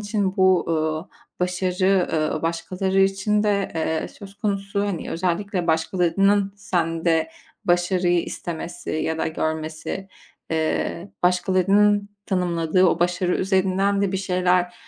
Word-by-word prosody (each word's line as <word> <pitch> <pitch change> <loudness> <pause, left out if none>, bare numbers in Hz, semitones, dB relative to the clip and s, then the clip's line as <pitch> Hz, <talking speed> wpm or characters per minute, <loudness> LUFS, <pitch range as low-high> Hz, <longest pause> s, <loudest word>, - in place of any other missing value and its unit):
için 205 -2 -1
bu, 185 -1 +4
ııı, 155 +1 -1 0.3
başarı, 180 +1 +1
ııı, 155 -1 0
başkaları 185 +3 0
için 195 +2 +2
de, 200 -2 0
eee, 160 0 -1
söz 200 -1 -12
konusu, 200 -1 -2
hani, 190 -5 -4
özellikle 180 +1 -1
başkalarının 190 +4 +2
sende 165 -3 0 0.3
başarıyı 175 0 +2
istemesi 170 0 -6
ya 160 +1 -1
da - - 0
görmesi, 160 +4 -3 0.4
eee, 160 +3 -1
başkalarının 195 +3 +3 0.2
tanımladığı 180 -1 +2
o 170 - +2
başarı 175 +1 +1
üzerinden 195 +1 +1
de 195 -1 0
bir - - 0
şeyler, 180 -1 +1
180 Hz, 115 wpm, -23 LUFS, 165-195 Hz, 0.4 s, bu